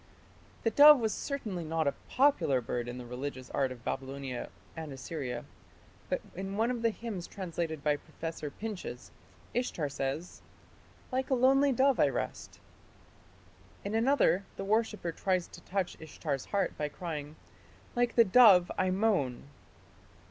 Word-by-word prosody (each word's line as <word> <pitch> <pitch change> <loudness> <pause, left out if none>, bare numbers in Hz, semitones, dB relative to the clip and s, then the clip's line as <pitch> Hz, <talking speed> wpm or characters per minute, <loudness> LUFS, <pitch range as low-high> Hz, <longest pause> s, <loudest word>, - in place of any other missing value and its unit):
The 225 - +2
dove 295 +1 +9
was 220 -2 0
certainly 215 - -4
not 160 0 -1
a 140 - +2 0.2
popular 265 - +3
bird 120 0 -3
in 120 +1 -5
the 125 - -7
religious 130 +1 -6
art 135 -2 0
of 120 -1 -10
Babylonia 135 -2 -4 0.3
and 160 -2 -6
Assyria, 135 -2 -5 0.6
but - - 0
in 195 +2 -4
one 230 +3 +2
of 240 -2 -3
the 230 - +3
hymns 215 -5 -5
translated 170 -5 -4
by 150 -1 +2
Professor 160 0 -6
Pinches 190 - -7 0.4
Ishtar 205 - -1
says, 140 +5 -4 0.7
"Like 260 +1 -1
a 265 - +3
lonely 270 +3 +4
dove 265 +2 +3
I - - +6
rest". - - -4 1.3
In 200 - -3
another 225 - +3
the 195 - -4
worshipper 210 -4 0
tries 185 +1 0
to - - -12
touch 190 -2 -2
Ishtar's 145 -3 -4
heart 200 -1 -1
by 150 -1 -1
crying, 150 -2 -6 0.6
"Like 245 0 +1
the 230 - +7
dove 195 -4 +7
I 185 - +2
moan". 185 - +1
180 Hz, 150 wpm, -31 LUFS, 145-225 Hz, 1.3 s, dove